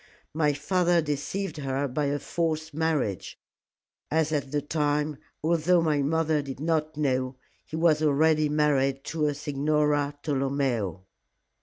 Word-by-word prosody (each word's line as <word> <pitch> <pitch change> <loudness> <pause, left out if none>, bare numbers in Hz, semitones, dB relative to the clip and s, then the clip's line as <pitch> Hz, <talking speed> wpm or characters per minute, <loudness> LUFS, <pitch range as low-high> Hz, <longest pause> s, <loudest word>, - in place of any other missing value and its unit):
My 150 -1 +2
father 175 +4 +2
deceived 155 +4 -3
her 140 -1 -1
by 145 +3 -1
a 140 +1 0
false 160 0 -2
marriage, 150 - -1 0.7
as 160 0 +1
at 140 -3 -1
the 150 - +1
time, 150 0 -1 0.3
although 170 +2 +3
my 150 -3 +2
mother 160 +1 +1
did 135 -2 -7
not 155 -1 -1
know, 130 -3 0 0.3
he 155 - -6
was 160 -2 +3
already 155 +1 +3
married 140 -2 +1
to 155 -2 -1
a 145 - -1
Signora 145 0 0
Tolomeo." 135 - -1
150 Hz, 135 wpm, -27 LUFS, 140-160 Hz, 0.7 s, although